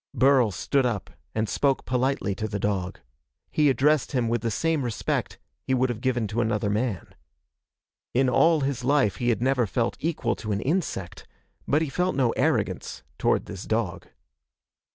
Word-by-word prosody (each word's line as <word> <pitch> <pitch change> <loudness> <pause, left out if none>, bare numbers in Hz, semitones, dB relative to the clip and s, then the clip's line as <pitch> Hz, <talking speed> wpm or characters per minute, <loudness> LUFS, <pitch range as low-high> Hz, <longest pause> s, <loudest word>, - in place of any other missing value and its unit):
Burl 130 -4 +4
stood 120 +9 0
up 115 -6 -2 0.2
and 110 0 0
spoke 135 +3 +1
politely 130 -4 0
to 110 +3 -3
the 105 -1 -3
dog. 95 -3 -2 0.5
He 150 -2 +3
addressed 145 +2 +2
him 120 -3 +1
with 120 -1 0
the 115 - -1
same 160 +7 0
respect 120 -3 -2 0.2
he 130 - 0
would 130 0 +2
have 120 -2 -4
given 125 -3 0
to 115 +4 0
another 105 -2 0
man. 105 -4 -2 1.0
In 130 +1 +4
all 160 +5 +4
his 135 -2 -2
life 130 -6 +2
he 120 -2 0
had 120 0 +1
never 130 -3 +2
felt 115 +4 -1
equal 135 -8 -1
to 105 - -5
an 100 - -1
insect, 135 - -2 0.4
but 150 +3 +2
he - - -2
felt 180 +5 0
no 125 -4 +2
arrogance - - -1 0.2
toward - - +2
this 95 -2 -8
dog. 110 -5 -2
120 Hz, 175 wpm, -26 LUFS, 110-135 Hz, 1.0 s, Burl